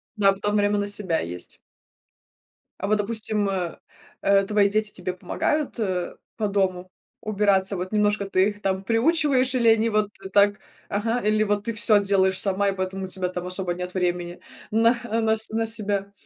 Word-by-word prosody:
Да, 200 Hz, -2 st, +4 dB
а -, -, +4 dB
потом 205 Hz, +1 st, -1 dB
время 205 Hz, 0 st, +2 dB
на 205 Hz, -, -2 dB
себя 190 Hz, -5 st, -1 dB
есть. 90 Hz, +1 st, -8 dB, 1.2 s
А 200 Hz, -, -3 dB
вот, 215 Hz, -, +2 dB
допустим, 210 Hz, -1 st, -1 dB, 0.7 s
э, 200 Hz, 0 st, +4 dB
твои 205 Hz, -1 st, +2 dB
дети 215 Hz, +1 st, -1 dB
тебе 180 Hz, 0 st, -4 dB
помогают 285 Hz, -, -2 dB, 0.6 s
по 215 Hz, -, 0 dB
дому 185 Hz, -2 st, -1 dB, 0.3 s
убираться? 200 Hz, -2 st, +1 dB
Вот 185 Hz, 0 st, -5 dB
немножко 210 Hz, -1 st, +1 dB
ты 190 Hz, +2 st, +3 dB
их 205 Hz, 0 st, -10 dB
там 190 Hz, -1 st, -1 dB
приучиваешь 265 Hz, -, +2 dB
или 235 Hz, -2 st, +2 dB
они 225 Hz, 0 st, +3 dB
вот 215 Hz, -1 st, +1 dB, 0.2 s
так, 205 Hz, 0 st, +4 dB, 0.3 s
ага, 225 Hz, +4 st, -1 dB
или 215 Hz, -1 st, +2 dB
вот 205 Hz, 0 st, 0 dB
ты 230 Hz, -, -1 dB
всё 210 Hz, -1 st, +5 dB
делаешь 190 Hz, -1 st, +2 dB
сама 200 Hz, 0 st, +1 dB
и 195 Hz, -, -2 dB
поэтому 190 Hz, 0 st, -3 dB
у -, -, -7 dB
тебя 185 Hz, -1 st, -3 dB
там 180 Hz, 0 st, -5 dB
особо 180 Hz, -1 st, -1 dB
нет 180 Hz, +1 st, -6 dB
времени 175 Hz, -1 st, -2 dB, 0.3 s
на 230 Hz, +2 st, +4 dB, 0.3 s
на 220 Hz, 0 st, +2 dB
с 220 Hz, -, 0 dB
на 225 Hz, +1 st, -1 dB
себя? 205 Hz, -3 st, -1 dB
205 Hz, 175 wpm, -24 LUFS, 190-215 Hz, 1.2 s, всё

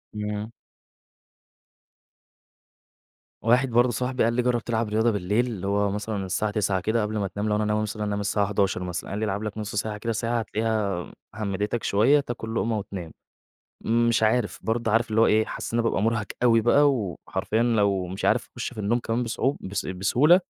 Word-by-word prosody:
إمم. 105 Hz, +1 st, -4 dB, 2.9 s
واحد 125 Hz, +3 st, +3 dB
برضه 120 Hz, +1 st, +3 dB
صاحبي 125 Hz, +2 st, -1 dB
قال 115 Hz, +1 st, +2 dB
لي: 125 Hz, -, +2 dB
"جرِّب 125 Hz, -1 st, +1 dB
تلعب 115 Hz, -2 st, -1 dB
رياضة 110 Hz, +2 st, +2 dB
بالليل." 105 Hz, +5 st, 0 dB
اللي 100 Hz, -5 st, -4 dB
هو 100 Hz, 0 st, +1 dB
مثلًا 105 Hz, -1 st, -3 dB
الساعة 105 Hz, +3 st, -1 dB
21:00 100 Hz, -2 st, 0 dB
كده 110 Hz, +4 st, +1 dB
قبل 105 Hz, +1 st, -2 dB
ما 100 Hz, -2 st, 0 dB
تنام، 105 Hz, +3 st, -3 dB
لو 105 Hz, -, +2 dB
أنا 105 Hz, -, 0 dB
ناوي 105 Hz, 0 st, +1 dB
مثلًا 105 Hz, 0 st, -3 dB
أنام 105 Hz, -1 st, -1 dB
الساعة 100 Hz, 0 st, +1 dB
23:00 100 Hz, -2 st, 0 dB
مثلًا، 90 Hz, 0 st, -4 dB
قال 100 Hz, -, -3 dB
لي: 110 Hz, -, 0 dB
"العب 105 Hz, +1 st, -2 dB
لك 105 Hz, 0 st, -5 dB
نص 105 Hz, -1 st, -5 dB
ساعة 105 Hz, 0 st, -2 dB
كده، 115 Hz, +2 st, -2 dB
ساعة، 115 Hz, +2 st, -1 dB
هتلاقيها 105 Hz, -7 st, -2 dB, 0.2 s
همِّدتك 105 Hz, +2 st, -2 dB
شوية، 115 Hz, +9 st, +4 dB
تاكل 115 Hz, -4 st, -5 dB
لقمة 115 Hz, 0 st, 0 dB
وتنام." 95 Hz, -5 st, -6 dB, 0.7 s
مش 115 Hz, 0 st, +2 dB
عارف، 110 Hz, 0 st, +1 dB
برضه 115 Hz, 0 st, 0 dB
عارف 115 Hz, +2 st, +2 dB
اللي 110 Hz, +1 st, +2 dB
هو -, -, +6 dB
إيه، 110 Hz, +1 st, +3 dB
حاسس -, -, -6 dB
إن 120 Hz, -, +2 dB
أنا -, -, +2 dB
بابقى -, -, -1 dB
مُرهَق 110 Hz, -1 st, +1 dB, 0.2 s
أوي 115 Hz, -2 st, +5 dB
بقى، 145 Hz, +5 st, +5 dB
وحرفيًا 105 Hz, -1 st, -2 dB
لو 100 Hz, -6 st, +2 dB
مش 95 Hz, +2 st, -4 dB
عارف -, -, +2 dB
أخش -, -, -4 dB
في -, -, -9 dB
النوم 110 Hz, +4 st, +1 dB
كمان 115 Hz, +1 st, -1 dB
بصع 120 Hz, +3 st, 0 dB
بس 100 Hz, +1 st, -4 dB
بسهولة، 125 Hz, -, +4 dB
110 Hz, 195 wpm, -25 LUFS, 100-115 Hz, 2.9 s, هو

